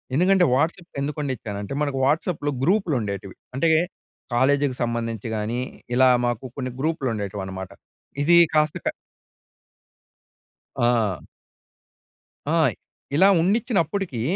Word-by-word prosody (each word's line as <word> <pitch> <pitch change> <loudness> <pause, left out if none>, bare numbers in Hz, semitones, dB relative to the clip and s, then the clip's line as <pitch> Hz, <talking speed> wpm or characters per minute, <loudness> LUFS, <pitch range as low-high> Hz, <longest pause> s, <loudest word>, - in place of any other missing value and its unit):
ఎందుకంటే, 180 +3 +4
వాట్సప్‌కి 165 +3 -2
ఎందుకున్నిచ్చానంటే, 130 -8 -4
మనకు 140 -2 -2
వాట్సాప్‌లో 145 0 0
గ్రూప్‌లుండేటివి. 125 - 0 0.2
అంటే, 165 +4 +3 0.7
కాలేజికి 140 +1 +2
సంబంధించి 115 -2 -3
గానీ, 110 +3 -2 0.4
ఇలా 130 0 +6 0.2
మాకు 120 +1 -2
కొన్ని 130 -2 -3
గ్రూప్‌లుండేటివనమాట. 100 - -3 0.5
ఇదీ 170 +3 +6 0.2
కాస్త 155 0 +3
క - - 0 1.9
ఆ! 115 -6 +1 1.4
ఆయ్! 130 -9 +3 0.4
ఇలా 190 +5 +6
ఉన్నిచ్చినప్పుటికీ, 190 - 0
135 Hz, 90 wpm, -23 LUFS, 115-160 Hz, 1.9 s, ఇలా